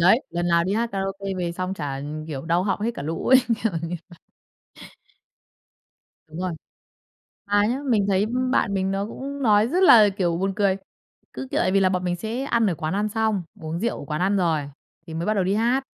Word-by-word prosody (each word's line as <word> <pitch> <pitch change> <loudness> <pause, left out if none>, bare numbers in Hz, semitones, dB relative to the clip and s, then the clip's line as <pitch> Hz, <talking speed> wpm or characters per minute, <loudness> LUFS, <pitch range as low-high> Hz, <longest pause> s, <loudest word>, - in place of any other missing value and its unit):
đấy, 185 +9 +5
lần 175 0 -1
nào 170 0 +3
đi 190 - -1
hát 230 +2 0
karaoke 195 0 -3
về 175 -1 -2
xong 185 +2 -3
chả, 140 -6 -4
ừm, 150 +3 -6
kiểu, 140 -3 -5
đau 170 +2 +1
họng 200 +1 -1
hết 225 +3 0
cả - - -6
lũ 160 +3 -4
ấy, 260 - +7 0.3
kiểu 225 - +2
như 165 +1 -3
vậy. 175 -2 -16 2.1
Đúng 155 - -9
rồi. 185 -1 -2 0.9
Mà 205 0 +3
nhá, 250 +5 -1
mình 205 -4 +3
thấy, 195 -1 +3
ưm, 255 0 0
bạn 200 -6 +1
mình 190 0 0
nó 195 +1 -1
cũng 275 +4 -6
nói 215 -1 +4
rất 365 +6 +1
là, 220 - +8
kiểu, 180 -3 -1
buồn 195 +2 -1
cười, 200 -2 +2 0.6
cứ, 265 - -6
kiểu, - - +2
vì 195 - +4
là 190 - +4
bọn 185 -1 -1
mình 175 0 0
sẽ 225 +8 -4
ăn 235 -4 +2
ở 175 - 0
quán 155 +2 -3
ăn 210 +2 0
xong, 215 -3 0 0.2
uống 160 +2 -4
rượu 235 +2 -1
ở - - -8
quán 150 +3 -3
ăn 195 +2 +2
rồi 165 -5 +1 0.4
thì 160 - -8
mới 165 +2 -3
bắt 215 - +2
đầu 195 - +1
đi 190 +2 +1
hát, 245 +5 +1
195 Hz, 230 wpm, -24 LUFS, 170-220 Hz, 2.1 s, là